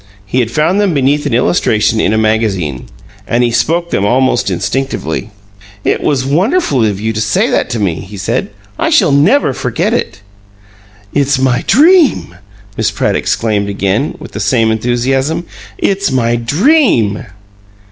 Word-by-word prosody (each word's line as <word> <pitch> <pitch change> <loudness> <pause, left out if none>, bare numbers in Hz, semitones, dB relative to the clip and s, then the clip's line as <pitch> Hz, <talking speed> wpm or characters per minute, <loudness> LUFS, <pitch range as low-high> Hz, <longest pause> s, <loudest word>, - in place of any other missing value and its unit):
He 110 +6 -1
had 120 -3 0
found 160 - +1
them 195 -6 +1
beneath 140 +2 +1
an - - -3
illustration 115 -5 +1
in 100 - +1
a 110 - +1
magazine, 105 - -1 0.4
and 120 +1 +1
he 120 - +1
spoke 165 +10 0
them 100 - 0
almost 125 +1 +1
instinctively. 100 - -3 0.5
"It - - 0
was 130 -3 0
wonderful 165 - +1
of 105 -3 -1
you 110 +1 -2
to 110 - -2
say 110 -1 +1
that - - 0
to 120 -2 -3
me," 90 -6 -1
he 100 +1 -10
said. 100 - -2 0.3
"I 330 0 +1
shall 215 - +3
never 150 - +3
forget - - -2
it!" - - -3 0.9
"It's 140 -1 +1
my 130 -2 0
DREAM!" 310 - +4 0.4
Miss - - 0
Pratt - - -1
exclaimed, 105 -3 -1
again, 100 +7 -1
with - - -10
the - - -6
same 115 -4 +1
enthusiasm. 130 +8 -1 0.3
"It's 200 -2 0
my 120 -3 +1
DREAM." 135 - +2
125 Hz, 155 wpm, -13 LUFS, 110-155 Hz, 0.9 s, DREAM